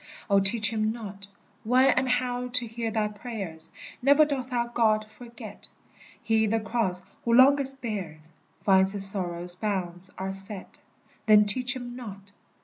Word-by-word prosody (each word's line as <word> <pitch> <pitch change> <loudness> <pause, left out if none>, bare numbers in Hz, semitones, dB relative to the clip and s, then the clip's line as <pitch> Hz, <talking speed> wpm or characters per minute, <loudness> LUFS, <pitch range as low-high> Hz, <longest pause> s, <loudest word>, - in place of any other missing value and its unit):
Oh, 200 - +5
teach 210 +3 +5
him 215 0 0
not 200 -4 -5 0.4
When 255 +4 +4
and 255 0 0
how 250 0 -1
to 245 0 0
hear 225 0 -5
thy 220 -1 -1
prayers; 205 -7 -6 0.3
Never 285 +4 +5
doth 265 -3 -4
our 240 -1 -1
God 215 -2 +1
forget; 235 +2 -9 0.6
He 220 -1 +1
the 225 +2 0
cross 210 -4 -2 0.2
who 235 - 0
longest 270 +1 +4
bears 165 -8 -6 0.3
Finds 190 0 +3
his 200 -1 +4
sorrows' 175 -2 -2
bounds 185 -3 +2
are 190 0 -4
set; 195 0 -2 0.5
Then 210 -1 +6
teach 250 +6 +3
him 245 -1 -8
not! 200 -5 -10
215 Hz, 150 wpm, -26 LUFS, 195-245 Hz, 0.6 s, Then